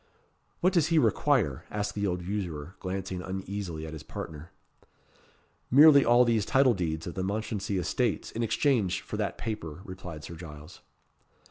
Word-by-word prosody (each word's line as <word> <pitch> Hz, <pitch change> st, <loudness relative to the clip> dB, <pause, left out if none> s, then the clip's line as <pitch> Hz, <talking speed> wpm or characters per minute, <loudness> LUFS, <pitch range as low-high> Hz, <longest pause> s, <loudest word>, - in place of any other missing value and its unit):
"What 185 Hz, +2 st, +3 dB
does 165 Hz, -4 st, +3 dB
he 165 Hz, -1 st, +2 dB
require?" 130 Hz, -, +2 dB
asked 105 Hz, -1 st, -2 dB
the 100 Hz, -1 st, -1 dB
old 90 Hz, -1 st, -2 dB
usurer, 90 Hz, -4 st, -4 dB
glancing 95 Hz, -1 st, -4 dB
uneasily 95 Hz, -3 st, -5 dB
at 80 Hz, -, -7 dB
his 80 Hz, -, -7 dB
partner. 80 Hz, +1 st, -8 dB, 1.2 s
"Merely 140 Hz, +1 st, +8 dB
all 120 Hz, +1 st, +5 dB
these 115 Hz, -3 st, +2 dB
title 130 Hz, +3 st, +4 dB
deeds 80 Hz, -5 st, -2 dB
of 85 Hz, -, -5 dB
the 95 Hz, -, -3 dB
Mounchensey 100 Hz, 0 st, -2 dB
estates 115 Hz, +5 st, -1 dB
in 115 Hz, -, -4 dB
exchange 115 Hz, -4 st, +1 dB
for -, -, -6 dB
that -, -, -2 dB
paper," 95 Hz, -8 st, -5 dB
replied 90 Hz, -5 st, -8 dB
Sir -, -, -8 dB
Giles. 75 Hz, -3 st, -11 dB
95 Hz, 155 wpm, -29 LUFS, 85-115 Hz, 1.2 s, Merely